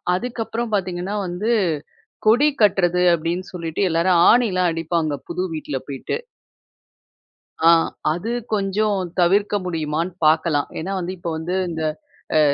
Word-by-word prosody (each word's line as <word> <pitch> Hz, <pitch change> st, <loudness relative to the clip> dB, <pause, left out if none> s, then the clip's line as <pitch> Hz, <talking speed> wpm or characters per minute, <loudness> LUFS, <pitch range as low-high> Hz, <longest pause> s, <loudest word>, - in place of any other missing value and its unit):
அதுக்கப்புறம் 230 Hz, +1 st, -3 dB
பாத்தீங்கன்னா 185 Hz, +1 st, -2 dB
வந்து, 195 Hz, +7 st, -2 dB, 0.8 s
"கொடி 265 Hz, +7 st, +5 dB
கட்டுறது" 180 Hz, -3 st, +3 dB
அப்படின்னு 170 Hz, +3 st, -3 dB
சொல்லிட்டு 170 Hz, +1 st, -2 dB
எல்லாரும் 170 Hz, +1 st, +3 dB
ஆணிலாம் 190 Hz, -7 st, +3 dB
அடிப்பாங்க, 165 Hz, -2 st, -1 dB
புது 185 Hz, -, -2 dB
வீட்டுல 145 Hz, -3 st, -4 dB
போயிட்டு. 135 Hz, -, -3 dB, 1.5 s
ஆ, -, -, +9 dB, 0.4 s
அது 200 Hz, +8 st, -4 dB, 0.2 s
கொஞ்சம் 200 Hz, 0 st, +1 dB, 0.2 s
தவிர்க்க 200 Hz, +4 st, +3 dB
முடியுமான்னு 165 Hz, +1 st, -2 dB
பார்க்கலாம். 155 Hz, -1 st, +3 dB
ஏன்னா 185 Hz, +5 st, -4 dB
வந்து, 180 Hz, +1 st, -3 dB
இப்போ 170 Hz, -1 st, -4 dB
வந்து 175 Hz, +3 st, -3 dB, 0.2 s
இந்த 160 Hz, -1 st, -3 dB, 0.5 s
அ -, -, +6 dB
180 Hz, 120 wpm, -21 LUFS, 165-200 Hz, 1.5 s, ஆ